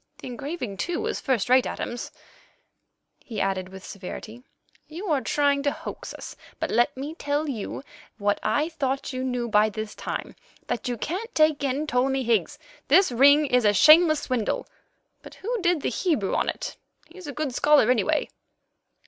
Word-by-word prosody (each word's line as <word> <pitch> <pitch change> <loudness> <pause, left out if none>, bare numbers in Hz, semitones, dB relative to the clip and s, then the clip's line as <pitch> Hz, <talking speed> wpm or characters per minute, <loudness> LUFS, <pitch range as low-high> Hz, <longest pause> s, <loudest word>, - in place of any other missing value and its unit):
The - - -11
engraving, 250 - -5
too, 350 - -2
is - - -2
first 255 -7 0
rate. 255 +1 +4
Adams," 240 - -5 1.1
he 220 -4 -7
added 190 -1 -1
with 190 0 -11
severity, 215 +4 -8 0.5
"you 340 +6 -7
are 285 -3 +2
trying 285 0 +1
to 285 0 +1
hoax - - -7
us, - - -9 0.2
but - - -2
let 240 +4 +2
me 285 +4 -5
tell 290 -1 -2
you 255 -1 -5 0.3
what 205 -1 0
I 290 +9 +1
thought 275 -4 -2
you 255 0 -3
knew 250 -2 -2
by 215 -1 +4
this 215 0 -6
time—that 240 - -6
you 245 -1 -2
can't 375 - -4
take 310 -2 +3
in 275 +2 0
Ptolemy 265 -1 +1
Higgs. 235 +5 +1 0.3
This 360 +2 +5
ring 285 +5 +6
is 250 -3 +2
a 205 -1 +4
shameless 310 - +7
swindle; 245 -5 -1 0.6
but - - -12
who 460 +2 -3
did 350 -4 +1
the - - +1
Hebrew 250 - 0
on - - +1
it? - - -5 0.3
He's 360 -1 -12
a - - -4
good 285 -1 -3
scholar, 290 -3 +4
anyway." 295 +6 +1
270 Hz, 170 wpm, -25 LUFS, 230-305 Hz, 1.1 s, shameless